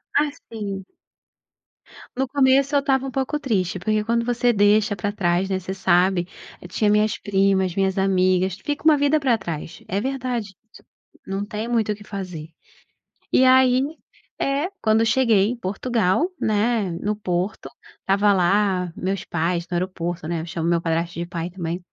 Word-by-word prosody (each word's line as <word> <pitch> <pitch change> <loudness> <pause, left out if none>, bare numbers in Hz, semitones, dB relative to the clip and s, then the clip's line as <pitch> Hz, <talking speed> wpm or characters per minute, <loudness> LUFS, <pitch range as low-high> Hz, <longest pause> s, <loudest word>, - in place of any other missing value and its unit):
Assim 215 -9 -2 1.3
no 265 +1 0
começo 275 +1 +3
eu - - +6
estava 270 -1 0
um - - -5
pouco 270 +3 -2
triste, 190 -9 -1
porque 215 +3 0
quando 235 +1 0
você 245 0 +1
deixa 205 0 +3
pra 200 +2 -2
trás, 185 -1 0
né, 190 - 0
você 190 +1 -5
sabe, 185 -1 +2 0.3
eu 180 - -9
tinha 210 +4 0
minhas 210 +1 +2
primas, 195 -2 +1
minhas 195 -1 0
amigas, 185 -1 +2
fica 290 0 -3
uma 315 - +7
vida 285 +2 +2
pra 260 -4 +2
trás, 165 -5 -6
é 195 +2 -1
verdade 245 -5 -3 0.2
isso, - - -16 0.4
não 195 +1 -3
tem 215 +1 -5
muito 225 -3 +1
o - - -2
que 205 - -14
fazer. 180 -6 -7 0.8
E 260 - +5
aí 255 -1 +5 0.6
É, 280 +6 0
quando 220 +1 +3
cheguei 225 -4 +3
em 250 - -3
Portugal, 225 - 0
né, 215 -1 +1
no 210 +1 -1
Porto, 185 -1 -3 0.3
estava 200 +1 +3
lá 185 -1 +2
meus 190 +1 -2
pais 170 +1 -2
no 175 - -3
aeroporto, 175 -2 -3
né, 170 -2 -2
eu - - -6
chamo 165 0 -3
meu 170 -1 +2
padrasto 170 +1 -1
de 170 - -3
pai 170 -1 -4
também, 175 -1 -4
200 Hz, 165 wpm, -22 LUFS, 185-240 Hz, 1.3 s, uma